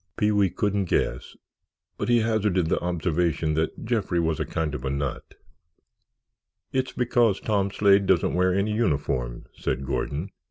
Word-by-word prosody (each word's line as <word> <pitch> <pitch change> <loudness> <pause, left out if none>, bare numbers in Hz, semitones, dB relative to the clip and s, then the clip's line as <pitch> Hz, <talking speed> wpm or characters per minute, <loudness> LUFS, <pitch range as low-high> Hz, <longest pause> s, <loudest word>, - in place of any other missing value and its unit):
Pee 105 0 +2
wee 100 -2 +3
couldn't 100 +1 0
guess, 60 -7 -1 0.6
but - - -2
he 120 -1 +4
hazarded 105 -6 +1
the - - +1
observation 85 -2 0
that 80 +7 -2
Jeffrey 110 -7 0
was 80 -2 0
a - - -1
kind 80 -2 -2
of 65 - -5
a 65 - -1
nut. 70 0 -4 1.4
"It's 130 0 -1
because 120 -4 +2
Tom 100 -2 0
Slade 100 0 +3
doesn't - - +2
wear 90 +1 +2
any 100 +3 0
uniform," 70 - -1
said 65 - -2
Gordon. 70 +7 -3
90 Hz, 155 wpm, -25 LUFS, 80-105 Hz, 1.4 s, he